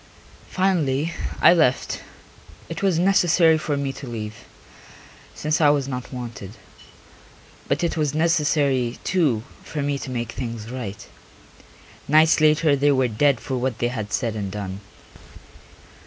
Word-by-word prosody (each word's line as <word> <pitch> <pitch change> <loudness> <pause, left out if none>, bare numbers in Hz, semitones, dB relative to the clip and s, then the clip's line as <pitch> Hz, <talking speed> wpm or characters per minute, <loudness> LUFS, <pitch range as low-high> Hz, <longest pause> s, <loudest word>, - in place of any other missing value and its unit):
Finally 170 -5 0 0.3
I - - +9
left; 155 -7 +1 0.7
it 165 - -5
was 190 -4 +2
necessary 175 -3 +4
for 150 -2 -2
me 140 -1 -2
to 135 - -9
leave, 110 -2 -7 0.9
since 155 +2 -1
I 150 - +6
was 145 -2 +1
not 125 -2 -5
wanted. 120 -6 -7 1.1
But - - 0
it 170 - 0
was 150 -2 -1
necessary, 145 -6 +1
too, 145 -12 +1 0.2
for 150 -3 -4
me 140 -1 -1
to - - -7
make 120 -2 -3
things 115 -2 -6
right. 115 -6 -6 1.0
Nights 155 +2 +5
later 155 -1 +4
they 145 +1 +3
were 130 -1 +2
dead 130 +3 +2
for 130 - -4
what 130 0 -2
they 120 - 0
had 110 -4 -5
said 115 -3 -1
and 100 -3 -4
done. 100 -2 -5
140 Hz, 140 wpm, -23 LUFS, 120-155 Hz, 1.1 s, I